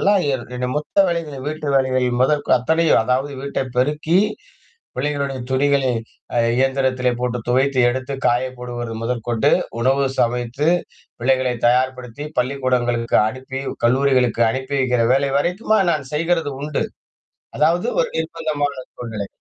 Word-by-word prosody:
எல்லாம் 200 -1 +3
என் 125 -2 -4
என்ன 125 0 -2
மொத்த 195 +6 +2
வேலைகள் 150 -5 -4
வீட்டு 155 -1 -4
வேலைகள் 130 -2 +1
முதற் 145 +2 +2
அத்தனையும் 160 +1 +3
அதாவது 130 +4 0
வீட்டை 140 -1 -2
பெருக்கி 150 +6 +2 0.8
பிள்ளைகளுடைய 140 0 -2
துணிகளை 135 0 +2 0.4
அ - - +2 0.2
இயந்திரத்திலே 130 -1 +1
போட்டு 125 -1 -1
துவைத்து 130 +2 +2
எடுத்து 130 +2 -3
காய 120 +1 +3
போடுவது 120 -1 -5
முதற்கொண்டு, 120 -1 0 0.3
உணவு 135 +3 +2 0.2
சமைத்து 120 +4 0 0.5
பிள்ளைகளை 130 0 +1
தயார்படுத்தி, 125 +2 0
பள்ளிக்கூடங்களுக்கு 125 -2 0
அனுப்பி 130 +3 -6 0.3
கல்லூரிகளுக்கு 125 -2 +3
அனுப்பி 130 +3 -4
வைக்கிற 125 -3 +2
வேலை 135 +1 +2
வரைக்குமா, 185 +9 +1
நான் 155 -4 -1
செய்கிறது 165 0 0
உண்டு. 150 0 -2 0.7
அதாவது 165 +4 +2
ஒரு - - +1
நிர்பந்தமான 155 -5 -2
சூழ்நிலை. 110 -4 -5
130 Hz, 125 wpm, -20 LUFS, 125-145 Hz, 0.8 s, எல்லாம்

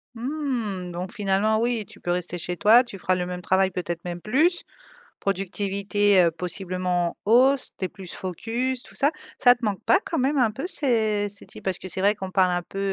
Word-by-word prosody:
Mmh, 235 - -3
donc, 180 +3 -5
finalement, 210 0 +1
oui, 235 -3 0
tu - - -14
peux 175 - -2
rester 175 0 -1
chez 175 +1 -4
toi. 225 +7 +6
Tu 200 -6 -10
feras 185 - +1
le 180 -1 -2
même 180 0 -5
travail, 190 +1 +2
peut-être 175 -1 -4
même 175 0 -5
plus, 320 - +2 0.6
productivité, 195 0 +1
heu, 170 - +3
possiblement 180 0 -2
en 210 - 0
hausse. 265 +3 +4
Tu 190 - -2
es - - -1
plus 185 -3 -9
focus, 235 +8 -3
tout - - -14
ça. 285 +2 +3 0.3
Ça 245 -1 +7
te 245 - -18
manque 210 -1 -2
pas, 375 - +4
quand 330 - -3
même 275 +2 +1
un 235 -3 +4
peu, 255 +8 -5
ces 220 - +1
ces 200 - -15
types? - - -13
Parce 190 -2 0
que, 185 - -9
c'est 185 - -3
vrai, 205 +2 +3
qu'on 190 -2 -6
parle 185 -2 +3
un 175 0 -1
peu, 195 - -8
200 Hz, 220 wpm, -25 LUFS, 180-240 Hz, 0.6 s, Ça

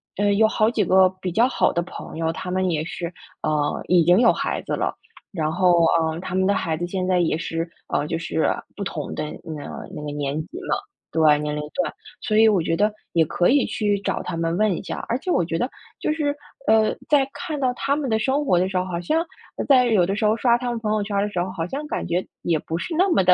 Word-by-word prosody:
呃， 205 0 +2
有 220 +2 +5
好 220 0 +2
几 215 -5 +1
个 185 0 +5
比 185 - -2
较 230 +5 +4
好 260 - +1
的 170 - +1
朋 175 - -8
友， 160 0 0
他 180 - -6
们 185 0 +1
也 155 -2 0
是， 170 0 -5 0.3
呃， 150 -1 0
已 175 -3 +5
经 180 +6 +5
有 235 - +6
孩 - - -2
子 - - -3
了。 - - -1 0.4
然 155 -3 -1
后， 180 +1 +3 0.3
呃， 160 0 -1
他 185 - -6
们 190 0 +2
的 200 - +3
孩 160 -1 -1
子 175 +2 -3
现 185 0 -2
在 185 -1 +2
也 165 -2 +1
是， 165 -1 -3 0.2
啊， 150 - -1
就 165 - -1
是 160 -1 0 0.3
不 200 - -3
同 155 -6 -4
的 - - -3 0.2
那 155 - -6
个 - - -7
那 - - -6
个 150 - -4
年 145 -1 -2
级 355 - -10
嘛， - - +3 0.3
对， 155 -2 +4
年 150 0 -2
龄 150 - -2
段， 180 - -1 0.3
所 215 - -1
以 220 0 +7
我 195 -5 +3
觉 165 - 0
得 210 +4 +2 0.2
也 165 -1 +4
可 175 +3 +1
以 280 0 +4
去 205 -2 0
找 - - -1
他 175 - -4
们 165 +1 -1
问 215 -3 +2
一 - - -7
下。 - - -5
而 235 - 0
且 365 - -3
我 175 - +2
觉 165 -1 -2
得 245 - -1 0.3
就 - - +1
是， 295 -2 0 0.3
呃， 220 0 +4
在 285 -3 +4
看 320 -4 -5
到 250 -1 +2
他 280 +3 0
们 285 -4 -2
的 220 0 +2
生 275 +5 +1
活 180 -6 +3
的 185 - +2
时 190 - -7
候， 180 - +1
好 175 -2 -3
像 310 - +1 0.3
呃， - - -2
在 255 -3 +6
有 210 -7 +3
的 195 +3 -2
时 215 - 0
候 215 +1 +4
刷 235 0 +3
他 245 0 -3
们 240 - -2
朋 215 -1 -2
友 215 - +1
圈 200 0 -3
儿 200 - +2
的 210 - -1
时 175 - -1
候， 185 - -2
好 165 -3 -2
像 285 - -5
感 - - -3
觉 175 +2 -1 0.2
也 165 -3 +1
不 160 - -4
是 325 - -4
那 375 +2 +4
么 195 - +3
地 180 0 +6
185 Hz, 290 characters per minute, -23 LUFS, 165-225 Hz, 0.4 s, 以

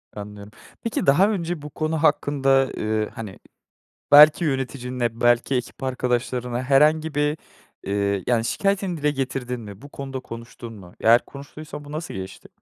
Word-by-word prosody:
Anlıyorum, 105 0 -9 0.3
peki, 230 - -2
daha 175 +9 +5
önce 175 -6 -3
bu 150 - -8
konu 155 +1 -2
hakkında, 135 -3 +2
eee, 110 0 -1
hani, 105 -4 -8 0.7
belki 150 +4 +8
yöneticinle, 125 -4 -2
belki 120 +2 +3
ekip 125 +1 -4
arkadaşlarına 125 -1 -2
herhangi 150 +3 +3
bir, 150 +1 +1 0.5
eee, 100 -1 -1
yani, 115 -2 +2
şikâyetini 195 +2 0
dile 150 0 +1
getirdin 130 -3 -3
mi? 100 -1 -11
Bu 145 - -12
konuda 135 -2 -6
konuştun 115 -1 -10
mu? 95 -5 -13
Eğer 115 +2 +5
konuştuysan 145 +1 -10
bu 145 - -11
nasıl 155 +2 -5
geçti? 95 0 -8
130 Hz, 145 wpm, -23 LUFS, 115-150 Hz, 0.7 s, belki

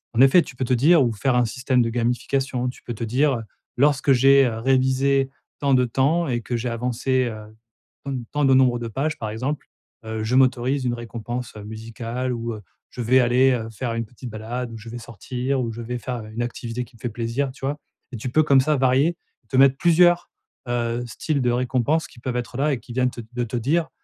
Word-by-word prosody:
en 115 - +4
effet, 135 +7 +7
tu 130 - -9
peux 130 - -2
te 125 - +1
dire 145 +5 +5
ou 120 - +1
faire 125 +4 0
un 125 -1 +3
système 125 +2 +1
de 115 - -1
gamification. 125 +2 -1
Tu 125 - -11
peux 120 - -6
te 110 - -5
dire, 135 +6 +2
heu, 115 - -4 0.4
lorsque 140 0 +4
j'ai, 135 +2 +6
heu, 115 -2 -3
révisé 135 +2 +2 0.3
tant 140 -2 +3
de 125 0 +3
temps 140 +8 +1
et 120 -3 -1
que 120 +1 -3
j'ai 120 +1 -2
avancé, 125 +2 0
heu, 110 -2 -7 0.5
comme 135 -4 -4
tant 145 -1 +1
de 135 - +5
nombre 125 -2 +4
de 120 - -4
pages 140 +8 -2
par 110 - -3
exemple. 130 +7 -3 0.4
Heu, 110 0 -4
je 110 +3 -2
m'autorise 130 +1 +2
une 120 -1 0
récompense, 120 +1 -6
heu, 105 - -8
musicale 115 +3 -4
ou, 115 0 -3
heu, 105 - -10 0.3
je - - -7
vais 125 +3 +4
aller, 125 +2 +4
heu, 115 -3 -2
faire 115 +2 -4
une 115 0 -2
petite 120 +2 -10
balade 115 +3 -5
ou 115 - -7
je 110 +1 -10
vais 120 - -6
sortir. 125 +3 -3
Ou 115 -2 -2
je 115 +1 -7
vais 125 +1 -4
faire 120 -1 -5
une 110 +2 -5
activité 120 0 -4
qui 120 +1 -22
me - - -19
fait 120 - -2
plaisir. 120 +4 -2
Tu 135 +1 -8
vois? 145 +2 -1 0.3
Et 125 - -5
tu 120 +4 -4
peux, 155 +5 +3
comme 140 -3 +5
ça 150 +3 +1
varier, 130 +4 +3
et 175 - -13
te 130 - -1
mettre 135 0 +6
plusieurs, 175 +1 +4 0.4
heu, 120 0 -1
styles 140 +4 -2
de 125 -1 +2
récompense 125 +5 0
qui 120 - -17
peuvent 125 0 -4
être 120 0 -4
là 145 +2 +2
et 130 - -2
qui 120 - -11
viennent 125 0 +1
te 120 - -8
de 125 0 -1
te 120 +1 -5
dire, 155 +8 0
125 Hz, 235 wpm, -23 LUFS, 115-135 Hz, 0.5 s, effet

